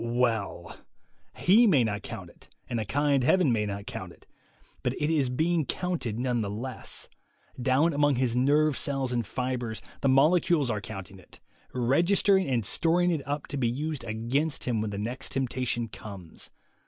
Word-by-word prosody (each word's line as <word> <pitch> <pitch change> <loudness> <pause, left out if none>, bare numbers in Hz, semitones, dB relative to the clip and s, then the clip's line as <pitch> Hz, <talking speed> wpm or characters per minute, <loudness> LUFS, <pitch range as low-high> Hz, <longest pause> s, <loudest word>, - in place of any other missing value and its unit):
Well! 115 -7 -1 0.6
he 220 +6 +5
may 145 - +5
not 105 -2 -2
count - - -8
it, - - -20 0.2
and 120 -2 -2
a 110 - -2
kind 140 +4 +2
Heaven 170 +1 +4
may 105 -2 +1
not 100 0 -5
count - - -6
it; - - -19 0.6
but - - 0
it 150 +2 0
is 140 -5 +2
being 160 +5 +1
counted 155 -9 -2
none 125 -1 0
the 100 - -2
less. 120 +6 -4 0.5
Down 135 +6 +3
among 145 -1 +3
his 120 -1 0
nerve 145 +3 +3
cells 135 -2 0
and 120 -1 0
fibres 125 0 -3 0.2
the 135 - +2
molecules 150 0 +4
are 105 -2 -2
counting 95 -2 -8
it, - - -17 0.3
registering 175 - +3
and 120 -5 0
storing 175 - +2
it 160 -4 -1
up 145 0 -2
to 145 - -3
be 120 -4 +1
used 150 +4 -3
against 125 +8 -1
him 115 -4 0
when 110 - -2
the 100 - -5
next 120 +6 -3
temptation 125 -3 -1
comes. 100 -6 -9
130 Hz, 175 wpm, -28 LUFS, 115-150 Hz, 0.6 s, he